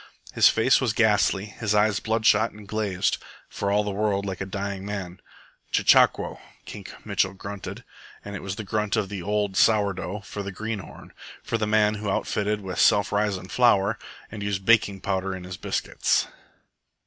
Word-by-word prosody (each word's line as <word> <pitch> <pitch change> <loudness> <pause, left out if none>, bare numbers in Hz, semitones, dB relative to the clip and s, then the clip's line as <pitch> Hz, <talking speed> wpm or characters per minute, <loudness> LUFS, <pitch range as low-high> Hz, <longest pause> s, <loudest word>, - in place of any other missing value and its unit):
His - - +6
face 115 +5 +3
was 120 -4 +1
ghastly, 105 -3 +2
his 105 0 -2
eyes 105 -2 +3
bloodshot 110 0 +2
and 105 -1 -13
glazed, 105 -3 -1 0.3
for 100 - -3
all 105 +1 +3
the 105 - -3
world 100 0 0
like 95 -2 -4
a 95 - -3
dying 100 0 -4
man. 100 -3 -6 0.5
"CHECHAQUO!" - - +4 0.3
Kink - - -10
Mitchell 95 0 0
grunted, 100 0 -7 0.4
and 100 -1 -6
it - - -6
was 95 0 -4
the 110 - -6
grunt 105 +1 -1
of 105 -4 -1
the 100 -2 -5
old 105 0 -1
"sour 105 -2 +4
dough" 95 +2 -5
for 100 +1 -7
the 100 0 -5
green 110 +2 -4
horn, 90 - -12 0.3
for 115 - -2
the 110 - 0
man 105 0 +3
who 105 - -2
outfitted 105 +2 -1
with 95 -2 -5
"self 100 - +4
risin'" 100 -3 -1
flour 110 -3 +3 0.3
and 105 -1 -7
used 100 -2 -2
baking 105 -4 +3
powder 95 -1 -2
in 90 - -8
his 90 0 -7
biscuits. - - 0
100 Hz, 180 wpm, -25 LUFS, 95-105 Hz, 0.5 s, His